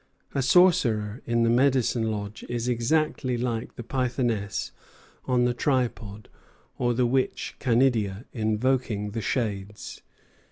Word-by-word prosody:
A 140 Hz, -, 0 dB
sorcerer 125 Hz, -, +3 dB
in 120 Hz, 0 st, +2 dB
the 115 Hz, -, +3 dB
medicine 125 Hz, -3 st, +2 dB
lodge 105 Hz, -1 st, -5 dB
is 120 Hz, 0 st, -2 dB
exactly 125 Hz, +1 st, 0 dB
like 120 Hz, -1 st, -3 dB
the 120 Hz, -, -7 dB
Pythoness 120 Hz, -5 st, -1 dB, 0.5 s
on 125 Hz, -1 st, +2 dB
the 125 Hz, -, +1 dB
tripod 120 Hz, -6 st, -2 dB, 0.5 s
or 120 Hz, -1 st, +1 dB
the 125 Hz, +1 st, +2 dB
witch 130 Hz, +2 st, -1 dB
Canidia 115 Hz, -4 st, +1 dB
invoking 110 Hz, -1 st, 0 dB
the 115 Hz, +2 st, -3 dB
shades." 105 Hz, -3 st, -3 dB
120 Hz, 120 wpm, -26 LUFS, 110-130 Hz, 0.5 s, sorcerer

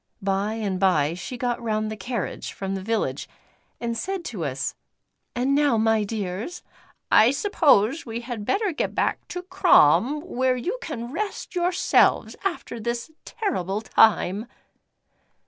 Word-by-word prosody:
By 195 Hz, +2 st, -1 dB
and 200 Hz, -4 st, -2 dB
bye 165 Hz, -6 st, +3 dB
she 180 Hz, +8 st, -6 dB
got 245 Hz, -1 st, -2 dB
round 215 Hz, -1 st, -1 dB
the -, -, -4 dB
carriage 215 Hz, -1 st, -4 dB
from 195 Hz, 0 st, -4 dB
the 195 Hz, -, -3 dB
village 225 Hz, +3 st, -2 dB, 0.5 s
and 235 Hz, -1 st, -2 dB
said 375 Hz, +7 st, -3 dB
to 200 Hz, -8 st, -4 dB
us: 135 Hz, -1 st, -2 dB, 0.6 s
"And 255 Hz, +3 st, +1 dB
now 285 Hz, -4 st, +3 dB
my 220 Hz, -1 st, +3 dB
dears, 205 Hz, -, -4 dB, 0.5 s
I 225 Hz, -, +7 dB
suppose 280 Hz, -, +3 dB
we 230 Hz, 0 st, -5 dB
had 235 Hz, -3 st, -5 dB
better 400 Hz, -, 0 dB
get 310 Hz, -, -3 dB
back -, -, -1 dB
to 360 Hz, -, -6 dB
Crom, 300 Hz, -6 st, +4 dB
where 260 Hz, -6 st, 0 dB
you 380 Hz, -, -3 dB
can 240 Hz, -6 st, -5 dB
rest 410 Hz, +6 st, -4 dB
yourselves 355 Hz, 0 st, +2 dB
after 345 Hz, -11 st, -3 dB
this 235 Hz, +6 st, -3 dB
terrible 210 Hz, -, -2 dB
time." 215 Hz, -1 st, +3 dB
235 Hz, 145 wpm, -24 LUFS, 205-295 Hz, 0.6 s, I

